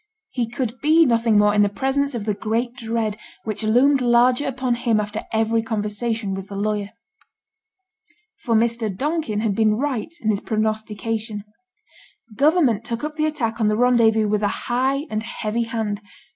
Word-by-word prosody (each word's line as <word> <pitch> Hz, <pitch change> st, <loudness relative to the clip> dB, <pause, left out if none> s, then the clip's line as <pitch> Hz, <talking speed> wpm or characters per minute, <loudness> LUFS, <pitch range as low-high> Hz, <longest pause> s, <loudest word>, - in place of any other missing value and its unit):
He 240 Hz, -3 st, -2 dB
could 245 Hz, 0 st, -4 dB
be 320 Hz, +2 st, +5 dB
nothing 230 Hz, -3 st, +3 dB
more 205 Hz, 0 st, +4 dB
in 210 Hz, -, +4 dB
the 205 Hz, -, +4 dB
presence 270 Hz, +5 st, -1 dB
of 215 Hz, -3 st, -4 dB
the 210 Hz, -, 0 dB
great 225 Hz, +4 st, -2 dB
dread 225 Hz, -3 st, -2 dB, 0.3 s
which 215 Hz, -2 st, -2 dB
loomed 255 Hz, +6 st, +4 dB
larger 245 Hz, +3 st, +3 dB
upon 260 Hz, -2 st, -1 dB
him 235 Hz, -2 st, +1 dB
after 210 Hz, +1 st, -3 dB
every 225 Hz, 0 st, +1 dB
conversation 220 Hz, -1 st, -2 dB
with 195 Hz, 0 st, -6 dB
the 200 Hz, -, -8 dB
lawyer. 205 Hz, 0 st, -2 dB, 1.5 s
For 230 Hz, -3 st, 0 dB
Mr. 230 Hz, 0 st, +1 dB
Donkin 270 Hz, -, -2 dB
had 220 Hz, -3 st, 0 dB
been 215 Hz, 0 st, +2 dB
right 275 Hz, +1 st, -2 dB
in 215 Hz, -, +1 dB
his 200 Hz, -, -1 dB
prognostication. 215 Hz, 0 st, -2 dB, 0.9 s
Government 280 Hz, -, +3 dB
took 230 Hz, +2 st, -4 dB
up 305 Hz, 0 st, -4 dB
the 310 Hz, 0 st, +1 dB
attack 240 Hz, -7 st, -2 dB
on 215 Hz, -, +3 dB
the 210 Hz, 0 st, +1 dB
Rendezvous 230 Hz, -3 st, +4 dB
with 210 Hz, 0 st, 0 dB
a 205 Hz, -, +2 dB, 0.2 s
high 265 Hz, +4 st, +1 dB
and 215 Hz, 0 st, -1 dB
heavy 230 Hz, 0 st, -3 dB
hand. 220 Hz, -3 st, -3 dB
225 Hz, 170 wpm, -22 LUFS, 215-250 Hz, 1.5 s, be